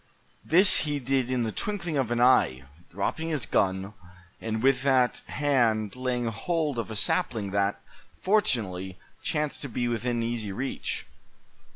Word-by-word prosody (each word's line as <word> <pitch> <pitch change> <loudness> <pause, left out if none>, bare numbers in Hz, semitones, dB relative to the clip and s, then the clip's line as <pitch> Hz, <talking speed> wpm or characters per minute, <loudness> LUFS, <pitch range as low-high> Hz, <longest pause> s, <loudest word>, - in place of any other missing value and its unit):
This 185 +5 +6
he 145 -2 -1
did 130 -1 0
in 125 -2 0
the 110 - -2
twinkling 175 - -3
of 135 -5 0
an 120 0 0
eye, 120 - +4 0.3
dropping 130 - -2
his 150 -8 -1
gun, 95 +1 0 0.5
and 110 0 -3
with 135 -1 +4
that 130 -2 +2
hand 120 -7 +1
laying 125 -1 -1
hold 150 +4 -1
of 115 - -4
a 110 - -5
sapling 105 0 0
that, 100 0 0 0.4
fortunately, 95 - 0 0.2
chanced 150 -1 -2
to 140 - -4
be 120 +1 -1
within 120 0 -1
easy 115 -3 -3
reach. 130 +7 -4
120 Hz, 150 wpm, -27 LUFS, 110-140 Hz, 0.5 s, This